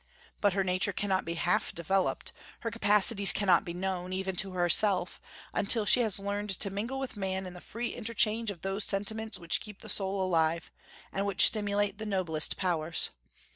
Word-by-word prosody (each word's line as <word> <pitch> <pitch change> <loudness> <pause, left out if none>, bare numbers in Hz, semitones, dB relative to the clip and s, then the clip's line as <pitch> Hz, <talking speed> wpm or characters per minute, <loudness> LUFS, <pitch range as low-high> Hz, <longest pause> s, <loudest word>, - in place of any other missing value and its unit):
But 205 -2 +2
her 195 0 +1
nature 185 +2 0
cannot 190 -1 -1
be 170 +1 -4
half 175 +2 0
developed, 185 +3 -1 0.3
her 230 - -3
capacities 205 -2 +6
cannot 195 +1 +3
be 175 - -6
known, 185 0 -3
even 190 0 -3
to 190 -1 0
herself, 180 +1 +2 0.3
until 215 +1 +2
she 250 - +5
has 220 -5 0
learned 205 +1 -4
to 200 - +1
mingle 225 +7 -4
with 270 -3 -5
man 190 -1 -3
in 180 - -8
the 180 - -11
free 240 +2 -4
interchange 225 -1 -1
of 175 -5 -7
those 195 +2 -2
sentiments 220 +3 -2
which 170 -1 -1
keep 210 -2 -11
the - - -9
soul 195 0 0
alive, 165 -2 0 0.4
and 195 +1 -1
which 195 -1 +4
stimulate 205 -1 +1
the 220 - -5
noblest 175 -6 -1
powers. 170 -3 +1
195 Hz, 180 wpm, -29 LUFS, 185-210 Hz, 0.4 s, capacities